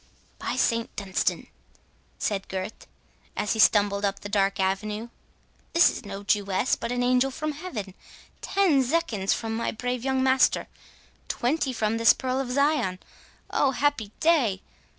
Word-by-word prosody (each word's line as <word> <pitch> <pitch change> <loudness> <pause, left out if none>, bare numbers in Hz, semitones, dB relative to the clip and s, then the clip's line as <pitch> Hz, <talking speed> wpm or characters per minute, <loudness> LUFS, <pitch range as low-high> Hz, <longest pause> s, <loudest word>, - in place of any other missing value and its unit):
"By - - -3
St 230 0 +1
Dunstan," 195 -2 -1 0.7
said 195 -2 -2
Gurth, 190 +3 -6 0.5
as 210 - 0
he 220 - -4
stumbled 205 -1 +4
up 200 -1 -1
the 205 - -7
dark 195 -1 +1
avenue, 210 +4 -1 0.6
"this 335 - +6
is - - -8
no 200 0 -7
Jewess, 200 +2 +1
but 230 - -5
an 245 0 0
angel 250 +2 +3
from 305 +3 -3
heaven! 280 - -6 0.5
Ten 375 -8 +3
zecchins 250 - 0
from 225 -1 -4
my 230 - -1
brave 245 +1 -3
young 265 -1 +1
master—twenty 265 +1 -1
from 225 -2 -1
this 230 0 +6
pearl 260 0 -2
of 270 -2 -3
Zion—Oh, 280 -1 -1
happy 270 -7 0
day! 260 - +2
230 Hz, 140 wpm, -26 LUFS, 200-265 Hz, 0.7 s, this